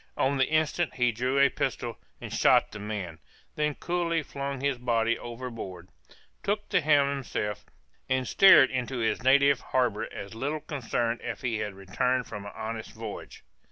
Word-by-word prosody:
On 135 +1 +1
the 130 - +3
instant 155 +2 0
he 125 -1 +2
drew 125 +4 -1
a 140 0 +6
pistol - - -3 0.2
and - - -7
shot - - +4
the 105 - -8
man; 100 -6 -5 0.3
then 150 -1 -1
coolly 170 -2 -1
flung 140 -1 -5
his 135 -2 -1
body 115 -1 +1
overboard, 115 -8 -7 0.5
took 205 +1 -1
the - - +3
helm 145 -2 +4
himself, 110 -7 -3 0.4
and 130 -1 +1
steered 190 -9 +7
into 125 0 -2
his 115 -2 0
native 140 +1 +5
harbor 120 -5 0
as 100 +1 -8
little 145 +7 -3
concerned 120 -5 -2
as - - -4
if - - -19
he 115 -3 -1
had 105 -2 -4
returned 125 +7 -1
from 100 -2 -7
an - - -7
honest 110 0 -5
voyage. 110 -2 -8
125 Hz, 170 wpm, -28 LUFS, 110-140 Hz, 0.5 s, steered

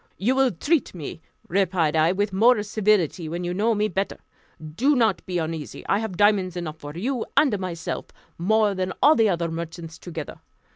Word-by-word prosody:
"You 235 +7 +1
will 265 -1 +3
treat 285 - 0
me," 160 -1 -7 0.3
replied 175 -4 +1
I, 160 +2 +4
"with 200 +1 -1
more 220 +2 +4
civility, 200 -6 +1
when 170 +2 -4
you 175 0 -2
know 220 +4 +1
me 210 +1 +1
better. 195 0 -2 0.6
Do 275 - +3
not 225 -6 +2
be 180 -1 -2
uneasy; 160 -2 -4
I 200 - +2
have 215 -5 -4
diamonds 195 -3 +3
enough 160 -3 -5
for 145 +2 -8
you 245 +5 -1
and 240 -10 +4
myself, 170 -3 -4 0.3
more 210 +3 +2
than 185 -1 -2
all 300 - +8
the 225 -2 +4
other 170 -2 -1
merchants 165 0 -7
together. 165 -4 -7
190 Hz, 185 wpm, -24 LUFS, 170-215 Hz, 0.6 s, all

